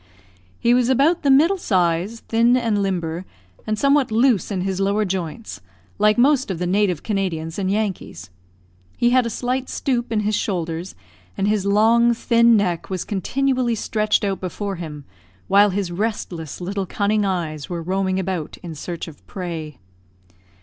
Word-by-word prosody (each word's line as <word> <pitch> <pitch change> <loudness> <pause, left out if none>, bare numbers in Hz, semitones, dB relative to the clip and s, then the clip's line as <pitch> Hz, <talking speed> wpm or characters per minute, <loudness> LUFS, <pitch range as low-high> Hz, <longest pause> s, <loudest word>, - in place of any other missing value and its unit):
He 235 - +3
was 250 0 +3
about 285 +7 +3
the 285 - +1
middle 325 +8 +5
size, 185 - 0
thin 235 +2 +3
and 225 -4 0
limber, 175 -3 -2 0.4
and 215 0 0
somewhat 275 -1 +3
loose 230 -3 +2
in 195 -3 -2
his 190 0 -2
lower 200 +2 +1
joints, 185 - -5 0.4
like 210 +1 +4
most 265 0 +3
of 190 - -2
the 180 - -2
native 185 -3 +1
Canadians 180 -5 -2
and 190 -1 -1
Yankees. 190 - -3 0.7
He 240 0 +3
had 250 -1 +3
a - - -2
slight 250 +3 -2
stoop 240 -3 -2
in 215 -2 +1
his 210 +1 -1
shoulders, 175 -3 -2 0.4
and 195 - 0
his 205 -2 +1
long, 230 +3 +4
thin 235 0 +4
neck 180 -5 -1
was 185 -2 -3
continually 250 +4 0
stretched 215 0 0
out 195 -2 -1
before 195 +1 -4
him, 150 -4 -7 0.4
while 205 +1 +5
his 190 -2 -2
restless 175 -5 -4
little 190 +1 -3
cunning 210 +2 0
eyes 165 -6 -3
were 170 -2 -4
roaming 190 +1 0
about 185 -4 -3
in 170 -2 -6
search 170 +3 -6
of 160 - -13
prey. 165 -6 -6
200 Hz, 165 wpm, -21 LUFS, 180-230 Hz, 0.7 s, middle